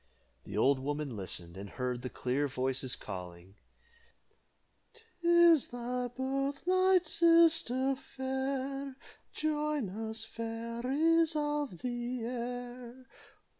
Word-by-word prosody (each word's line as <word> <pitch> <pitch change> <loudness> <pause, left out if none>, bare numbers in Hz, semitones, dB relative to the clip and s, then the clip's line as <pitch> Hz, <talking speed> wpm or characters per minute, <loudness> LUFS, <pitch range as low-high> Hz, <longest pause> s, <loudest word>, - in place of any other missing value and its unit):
The 100 - -6
old 135 +4 +4
woman 145 -1 -3
listened, 90 -3 -4
and 100 +1 -7
heard 125 +2 -3
the 125 - -4
clear 130 +5 -1
voices 130 0 -1
calling: 90 -1 -8 1.7
"'Tis 340 -3 +6
thy 245 +1 -3
birthnight, 280 +9 +1
sister 325 -6 +4
fair, 265 0 -4 0.4
Join 300 -6 -1
us 220 +2 -4
fairies 240 +9 0
of 295 - -2
the 240 -1 -3
air. 245 +1 -6
250 Hz, 95 wpm, -32 LUFS, -, 1.7 s, Tis